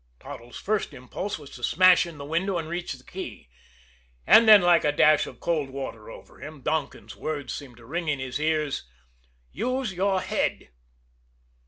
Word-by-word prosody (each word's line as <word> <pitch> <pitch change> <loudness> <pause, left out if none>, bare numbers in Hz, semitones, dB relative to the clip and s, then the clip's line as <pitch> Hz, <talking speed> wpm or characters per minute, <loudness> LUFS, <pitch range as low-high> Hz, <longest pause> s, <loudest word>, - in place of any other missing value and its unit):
Toddles' 120 +1 -10
first 210 -8 -2
impulse 135 +11 -5
was 145 -3 -13
to 120 - -12
smash 185 +5 +5
in 165 -3 -10
the 140 - -8
window 175 +5 -1
and 165 -2 -4
reach 175 +1 -4
the - - -14
key. - - -8 0.8
And 230 - +7
then, 210 -1 +11
like 175 -1 +5
a 150 - +3
dash 150 +1 +4
of - - -11
cold 155 -5 -1
water 130 -5 -7
over 115 - -13
him, 150 +1 -9
Donkin's 155 +4 -3
words 145 -5 -4
seemed 130 -5 -9
to 115 - -15
ring 170 +6 -4
in 150 -2 +1
his 130 0 -4
ears: 155 - -1 0.6
"Use 255 -4 -2
your 190 +1 +1
head." - - -2
155 Hz, 175 wpm, -26 LUFS, 135-180 Hz, 0.8 s, then